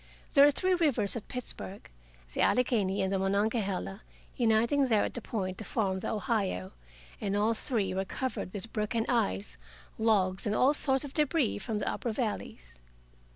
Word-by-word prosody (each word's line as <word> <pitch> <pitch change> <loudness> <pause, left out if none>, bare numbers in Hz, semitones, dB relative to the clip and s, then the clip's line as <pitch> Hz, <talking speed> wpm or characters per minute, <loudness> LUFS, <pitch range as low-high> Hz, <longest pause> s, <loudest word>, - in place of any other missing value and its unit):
There 280 0 +8
are - - +6
three 370 +6 +2
rivers 295 - +2
at 230 - -6
Pittsburgh, 230 -5 -6 0.5
the - - -1
Allegheny 215 -7 +2
and 190 +1 -1
the 195 - +1
Monongahela 200 0 -1 0.3
uniting 235 +4 +3
there 220 -4 +3
at - - -3
the 240 - -4
Point 190 -5 -3
to - - -5
form 195 -4 -1
the - - -4
Ohio. 205 - -1 0.5
And 200 -1 -1
all 215 +2 +2
three 220 -5 -1
were 190 +1 -1
covered 210 -1 -4
with 210 +3 -6
broken 225 +1 -1
ice, 95 - 0 0.4
logs, 200 -4 +2
and 210 - 0
all 270 +6 +4
sorts 270 -2 +3
of 285 -1 -8
debris 300 -7 +1
from 215 +2 -3
the - - -3
upper 235 - -2
valleys. 70 - -4
215 Hz, 170 wpm, -30 LUFS, 195-250 Hz, 0.5 s, There